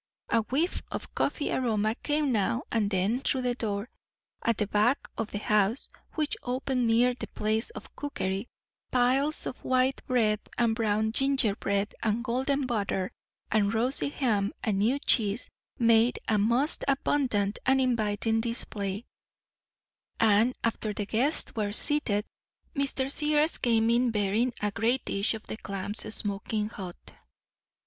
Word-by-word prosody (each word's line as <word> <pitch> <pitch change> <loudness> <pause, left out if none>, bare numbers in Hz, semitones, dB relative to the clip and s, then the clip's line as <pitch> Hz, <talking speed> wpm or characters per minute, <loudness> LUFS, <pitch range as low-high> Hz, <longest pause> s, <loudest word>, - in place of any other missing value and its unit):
A 230 - +3
whiff 285 - -1
of - - -6
coffee 290 - -1
aroma 220 -4 +1
came 295 +2 0
now 225 +1 +1
and 215 -3 +1
then 200 +5 +1
through 260 -1 0
the 245 -1 +1
door 210 -2 -3 0.6
at 230 -2 +1
the 210 - +1
back 210 +6 +1
of 225 -1 -3
the - - -4
house, 210 +3 +1 0.3
which 305 -2 0
opened 250 0 -1
near 240 +2 +4
the 245 - -7
place 215 +2 -1
of 460 - -11
cookery; 200 -8 -3 0.4
piles 260 +5 +2
of - - -6
white 260 +1 +1
bread 220 -5 +2 0.2
and 235 -2 +3
brown 220 -1 +1
gingerbread, 220 -6 +1
and 220 +1 0
golden 265 +3 0
butter 200 -6 -1 0.4
and 210 0 +2
rosy 255 +5 +5
ham 215 -8 0
and 205 -3 0
new 235 +7 +2
cheese, 225 -5 +1 0.3
made 230 0 +4
a 215 -2 +2
most 240 +9 +2
abundant 255 -7 +1
and 265 0 +3
inviting 225 -3 +1
display; 210 -3 -2 1.1
and, 225 +3 +4
after 220 -2 -1
the 205 - -2
guests 250 +9 +1
were 210 -2 -1
seated, 215 -4 +1 0.5
Mr. 275 -1 0
Sears 300 +2 +2
came 230 -1 +3
in 240 +1 +3
bearing 215 +3 +1
a 210 0 0
great 230 +6 0
dish 200 +3 0
of 220 - -9
the - - -6
clams, 200 +1 -4
smoking 210 +1 -2
hot. 185 -5 -9
225 Hz, 145 wpm, -28 LUFS, 210-255 Hz, 1.1 s, rosy